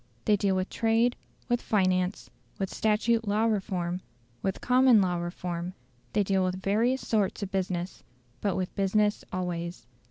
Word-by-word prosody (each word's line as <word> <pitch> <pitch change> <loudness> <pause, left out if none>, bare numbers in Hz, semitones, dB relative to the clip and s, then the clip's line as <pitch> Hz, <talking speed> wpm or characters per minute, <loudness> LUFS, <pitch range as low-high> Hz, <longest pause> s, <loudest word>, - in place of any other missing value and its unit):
They 210 - +5
deal 195 -1 +1
with 185 0 -1
trade, 230 +2 +2 0.3
with 240 -1 +1
finance, 185 -2 0 0.3
with 195 -1 -3
statute 225 +1 +1
law 210 +2 +2
reform, 185 -5 -1 0.4
with 190 -1 -1
common 250 -2 +5
law 180 -3 +1
reform; 175 0 -4 0.4
they 205 - +3
deal 195 -1 +1
with 185 0 -1
various 225 +7 +1
sorts 205 -2 +1
of 195 - -5
business, 185 -1 -2 0.4
but 200 -3 0
with 185 -1 -2
business 205 +1 +1
always. 175 -5 -4
195 Hz, 150 wpm, -28 LUFS, 185-215 Hz, 0.4 s, They